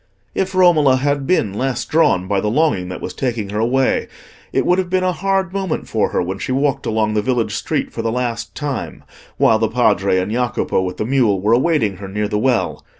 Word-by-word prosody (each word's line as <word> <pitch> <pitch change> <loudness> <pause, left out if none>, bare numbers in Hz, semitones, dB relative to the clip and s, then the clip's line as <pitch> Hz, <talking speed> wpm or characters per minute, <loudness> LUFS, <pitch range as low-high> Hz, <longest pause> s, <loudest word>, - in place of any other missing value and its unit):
If 190 0 -2
Romola 160 -7 +5
had 140 +1 -1
been 110 - +1
less 130 +4 -2
drawn 125 - +2
by 100 0 +1
the 105 - -1
longing 110 - +1
that 90 - -6
was - - -5
taking 115 -6 -3
her 105 - -2
away, 130 +4 +1 0.4
it - - 0
would 180 +1 +3
have 185 -2 -2
been 185 0 +1
a 185 - +2
hard 190 0 -1
moment 195 -4 -3
for - - 0
her - - 0
when 95 +2 -4
she - - -4
walked 135 +1 0
along 110 -1 0
the 105 - +1
village 120 +1 -1
street - - -2
for - - -3
the 115 - -1
last 115 -3 -3
time, 145 -3 -4 0.3
while - - +4
the - - +1
Padre 95 - +2
and 95 +3 -1
Jacopo, 120 -4 0
with 90 -1 -4
the 110 - -2
mule, 120 -6 +2
were 105 +4 +2
awaiting 120 - +1
her 100 +1 -8
near 105 +2 -2
the 105 0 -1
well. 125 0 0
125 Hz, 220 wpm, -19 LUFS, 105-150 Hz, 0.4 s, Romola